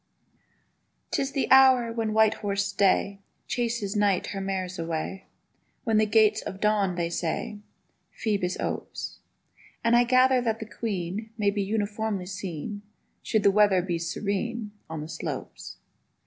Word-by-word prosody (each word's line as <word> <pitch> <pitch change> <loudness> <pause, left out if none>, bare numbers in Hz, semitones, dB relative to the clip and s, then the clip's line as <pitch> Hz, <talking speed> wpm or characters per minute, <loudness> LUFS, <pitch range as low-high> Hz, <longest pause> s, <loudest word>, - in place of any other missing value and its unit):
'TIS 270 0 -1
the 270 - -1
hour 260 -3 +6
when 225 -2 -1
white 220 0 +4
horsed 200 -1 -1
Day 195 0 +2 0.3
Chases 235 -4 -2
Night 205 -3 +2
her 195 - -3
mares 185 -2 -3
away; 165 +3 -4 0.6
When 225 -4 +2
the 215 0 +4
Gates 215 0 +4
of 190 - -7
Dawn 205 -3 +2
(they 170 -1 -1
say) 175 +6 -3 0.6
Phœbus 200 -5 -1
opes: - - -4 0.6
And 230 0 +4
I 240 - +6
gather 255 +1 +4
that 225 -2 0
the 220 - -5
Queen 200 0 -4
May 205 -2 +2
be 205 0 -1
uniformly 205 -1 -2
seen, 190 +1 -5 0.4
Should 215 -2 0
the 200 - +6
weather 200 -3 +4
be 175 -2 -2
serene, 210 +5 -3 0.2
On 160 -1 -5
the 155 - -6
slopes. - - -6
205 Hz, 145 wpm, -27 LUFS, 190-225 Hz, 0.6 s, hour